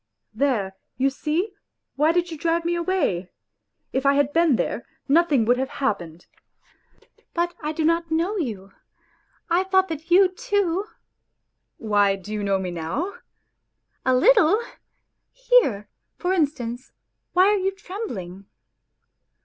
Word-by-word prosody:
" -, -, -56 dB
There, 215 Hz, -6 st, 0 dB, 0.2 s
you 270 Hz, +2 st, +2 dB
see; 330 Hz, +9 st, -2 dB, 0.4 s
why 300 Hz, +3 st, +3 dB
did 350 Hz, 0 st, 0 dB
you -, -, -4 dB
drive 335 Hz, +2 st, 0 dB
me 340 Hz, -, +1 dB
away? 340 Hz, -, -1 dB, 0.6 s
If 265 Hz, -, 0 dB
I 280 Hz, 0 st, +4 dB
had 285 Hz, 0 st, +1 dB
been 330 Hz, -6 st, +4 dB
here, -, -, -2 dB, 0.2 s
nothing 290 Hz, -5 st, +3 dB
would 245 Hz, +2 st, +3 dB
have 265 Hz, 0 st, -1 dB
happened.. 175 Hz, -, -3 dB, 0.4 s
." -, -, -36 dB
" -, -, -34 dB
But 345 Hz, 0 st, 0 dB
I 305 Hz, 0 st, -2 dB
did 315 Hz, 0 st, -1 dB
not 335 Hz, 0 st, +1 dB
know 335 Hz, +6 st, 0 dB
you; 215 Hz, -, -4 dB, 0.8 s
I 350 Hz, +2 st, +2 dB
thought 380 Hz, 0 st, +2 dB
that 320 Hz, +1 st, -6 dB
you 370 Hz, +2 st, +6 dB
too.. 400 Hz, -3 st, -1 dB, 0.3 s
' -, -, -54 dB
" -, -, -54 dB
Why, 205 Hz, -2 st, +2 dB
do 195 Hz, +2 st, -9 dB
you 210 Hz, -1 st, -2 dB
know 195 Hz, -1 st, +1 dB
me 185 Hz, -1 st, -4 dB
now? 175 Hz, -, -3 dB, 0.3 s
" -, -, -53 dB
" -, -, -48 dB
A 260 Hz, -1 st, +3 dB
little! 425 Hz, -, +5 dB, 0.7 s
Here, -, -, +2 dB, 0.3 s
for 365 Hz, +1 st, 0 dB
instance, 260 Hz, -7 st, -2 dB, 0.4 s
why 370 Hz, +1 st, +5 dB
are 415 Hz, -, +3 dB
you 380 Hz, +1 st, +1 dB
trembling 300 Hz, -, -7 dB
310 Hz, 155 wpm, -23 LUFS, 220-360 Hz, 0.8 s, you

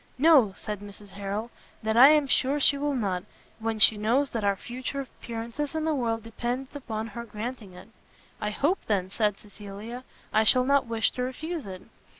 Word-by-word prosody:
"No," 265 Hz, -9 st, +5 dB
said 210 Hz, -2 st, -5 dB
Mrs 205 Hz, 0 st, -12 dB
Harrel, 200 Hz, +4 st, -4 dB, 0.3 s
"that 220 Hz, 0 st, 0 dB
I 260 Hz, +4 st, +9 dB
am 300 Hz, -1 st, +5 dB
sure 275 Hz, +1 st, +2 dB
she 285 Hz, -, +5 dB
will 285 Hz, 0 st, -1 dB
not, 190 Hz, -7 st, -1 dB, 0.4 s
when 225 Hz, 0 st, -2 dB
she 215 Hz, 0 st, +7 dB
knows 250 Hz, +7 st, +1 dB
that 225 Hz, -3 st, -3 dB
our 200 Hz, -1 st, +2 dB
future 255 Hz, +6 st, -5 dB
appearance 235 Hz, -1 st, -8 dB, 0.2 s
in 315 Hz, 0 st, -1 dB
the 320 Hz, -, +1 dB
world 230 Hz, -5 st, -1 dB
depends 245 Hz, +4 st, -4 dB
upon 220 Hz, -6 st, -4 dB
her 230 Hz, +1 st, -7 dB
granting 220 Hz, -2 st, -7 dB
it." 180 Hz, -, -12 dB, 0.5 s
"I 210 Hz, -, -1 dB
hope, 290 Hz, -, +1 dB
then," 190 Hz, -3 st, 0 dB
said 210 Hz, -2 st, +1 dB
Cecilia, 210 Hz, +4 st, -9 dB, 0.3 s
"I 220 Hz, -, +4 dB
shall 250 Hz, +3 st, +5 dB
not 280 Hz, -1 st, +3 dB
wish 225 Hz, -1 st, +1 dB
to 250 Hz, -, -5 dB
refuse 300 Hz, +3 st, -4 dB
it." 185 Hz, -1 st, -8 dB
230 Hz, 185 wpm, -27 LUFS, 210-265 Hz, 0.5 s, I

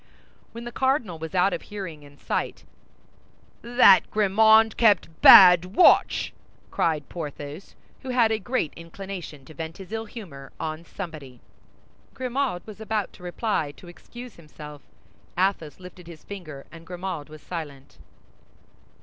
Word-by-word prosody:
When 235 Hz, +1 st, -9 dB
the 240 Hz, -, -7 dB
cardinal 255 Hz, -, -1 dB
was 160 Hz, +3 st, -7 dB
out 185 Hz, +2 st, +3 dB
of -, -, -4 dB
hearing 185 Hz, -8 st, -8 dB
and 145 Hz, -1 st, -17 dB
sight, -, -, -3 dB, 1.0 s
"That 240 Hz, -4 st, +5 dB
Grimaud 220 Hz, +1 st, +4 dB
kept 200 Hz, -8 st, +2 dB
bad 180 Hz, 0 st, +8 dB
watch!" 360 Hz, -, +4 dB, 0.4 s
cried 155 Hz, -4 st, -1 dB
Porthos, 150 Hz, +1 st, -8 dB, 0.3 s
who 265 Hz, -, -8 dB
had 240 Hz, -3 st, +2 dB
a 220 Hz, -, 0 dB
great 225 Hz, -, -2 dB
inclination 170 Hz, -4 st, -9 dB
to 155 Hz, -, -14 dB
vent 160 Hz, +1 st, -7 dB
his 190 Hz, 0 st, -12 dB
ill 225 Hz, 0 st, -4 dB
humor 165 Hz, -, -11 dB
on 160 Hz, +1 st, -5 dB
somebody. 155 Hz, -10 st, -9 dB, 0.8 s
Grimaud 255 Hz, -6 st, -3 dB
was 215 Hz, 0 st, -11 dB
about 215 Hz, -2 st, -3 dB
to -, -, -17 dB
reply 175 Hz, -4 st, -2 dB
to 180 Hz, -, -15 dB
excuse 240 Hz, +8 st, -12 dB
himself. 150 Hz, -2 st, -12 dB, 0.6 s
Athos 185 Hz, -5 st, -1 dB
lifted 180 Hz, -1 st, -13 dB
his 165 Hz, -2 st, -12 dB
finger, 155 Hz, -9 st, -9 dB
and 165 Hz, 0 st, -14 dB
Grimaud 180 Hz, -4 st, -6 dB
was 155 Hz, 0 st, -13 dB
silent. 140 Hz, -, -8 dB
180 Hz, 140 wpm, -24 LUFS, 155-215 Hz, 1.0 s, bad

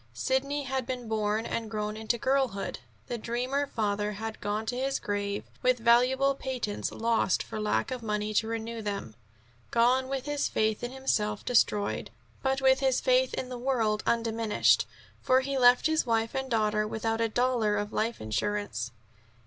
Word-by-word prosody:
Sidney 275 Hz, -, 0 dB
had 265 Hz, -2 st, -2 dB
been 250 Hz, -2 st, -4 dB
born 215 Hz, 0 st, 0 dB
and 225 Hz, -1 st, -3 dB
grown 215 Hz, 0 st, -4 dB
to 235 Hz, -, +2 dB
girlhood; 260 Hz, -5 st, 0 dB, 0.3 s
the 240 Hz, -, -4 dB
dreamer 250 Hz, +5 st, -1 dB
father 210 Hz, -3 st, -1 dB
had 220 Hz, +2 st, -6 dB
gone 210 Hz, +2 st, -2 dB
to 245 Hz, -, -2 dB
his 270 Hz, +2 st, 0 dB
grave, 205 Hz, 0 st, -2 dB, 0.2 s
with 255 Hz, 0 st, +3 dB
valuable 250 Hz, +4 st, +4 dB
patents 255 Hz, -6 st, -3 dB
lost 225 Hz, -4 st, +1 dB
for 220 Hz, -, -6 dB
lack 210 Hz, +4 st, 0 dB
of 255 Hz, -1 st, -3 dB
money 210 Hz, -1 st, -2 dB
to 220 Hz, +1 st, +2 dB
renew 230 Hz, 0 st, -4 dB
them 200 Hz, -, -4 dB, 0.6 s
gone 250 Hz, +3 st, +3 dB
with 270 Hz, -1 st, -3 dB
his 290 Hz, -1 st, 0 dB
faith 220 Hz, 0 st, 0 dB
in 240 Hz, -, -3 dB
himself 210 Hz, -6 st, -1 dB
destroyed, 210 Hz, -4 st, +1 dB, 0.3 s
but 270 Hz, 0 st, 0 dB
with 265 Hz, 0 st, +5 dB
his 265 Hz, -2 st, +2 dB
faith 255 Hz, 0 st, +2 dB
in 255 Hz, -, -4 dB
the 250 Hz, -1 st, -6 dB
world 230 Hz, -5 st, +1 dB
undiminished: 230 Hz, -2 st, +2 dB, 0.3 s
for 260 Hz, 0 st, +4 dB
he 275 Hz, +1 st, -3 dB
left 245 Hz, -1 st, +5 dB
his 315 Hz, 0 st, +3 dB
wife 225 Hz, -2 st, 0 dB
and 265 Hz, 0 st, -3 dB
daughter 215 Hz, -2 st, +1 dB
without 225 Hz, +1 st, -1 dB
a 230 Hz, -, +2 dB
dollar 235 Hz, -3 st, +1 dB
of 205 Hz, +1 st, -3 dB
life 230 Hz, +2 st, -1 dB
insurance. 120 Hz, -, -2 dB
230 Hz, 170 wpm, -29 LUFS, 215-260 Hz, 0.6 s, with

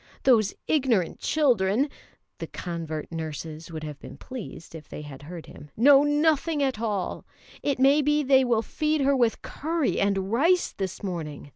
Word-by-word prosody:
Those 225 Hz, -6 st, +4 dB
ignorant 255 Hz, -, +1 dB
children" 250 Hz, -4 st, +2 dB, 0.5 s
(the -, -, -5 dB
convert 165 Hz, -3 st, -5 dB
nurses 160 Hz, 0 st, -6 dB
would 155 Hz, -1 st, -6 dB
have 150 Hz, -2 st, -7 dB
been -, -, -11 dB
pleased 240 Hz, -11 st, -9 dB
if 155 Hz, -2 st, -10 dB
they 150 Hz, -, -7 dB
had 140 Hz, -2 st, -10 dB
heard 165 Hz, +3 st, -9 dB
him) 150 Hz, -, -13 dB
"know 275 Hz, +4 st, +7 dB
nothing 295 Hz, +1 st, +2 dB
at 265 Hz, -5 st, -1 dB
all. 210 Hz, -5 st, -2 dB, 0.4 s
It 280 Hz, -2 st, 0 dB
may 275 Hz, +3 st, +5 dB
be 295 Hz, +1 st, +2 dB
they 265 Hz, -1 st, +5 dB
will 235 Hz, -3 st, +1 dB
feed 305 Hz, +2 st, -1 dB
her 275 Hz, +1 st, +3 dB
with 240 Hz, -3 st, +1 dB
curry 320 Hz, 0 st, -1 dB
and 195 Hz, -1 st, 0 dB
rice 335 Hz, +10 st, +3 dB
this 190 Hz, +1 st, -5 dB
morning. 160 Hz, -7 st, -5 dB
225 Hz, 165 wpm, -26 LUFS, 165-280 Hz, 0.5 s, know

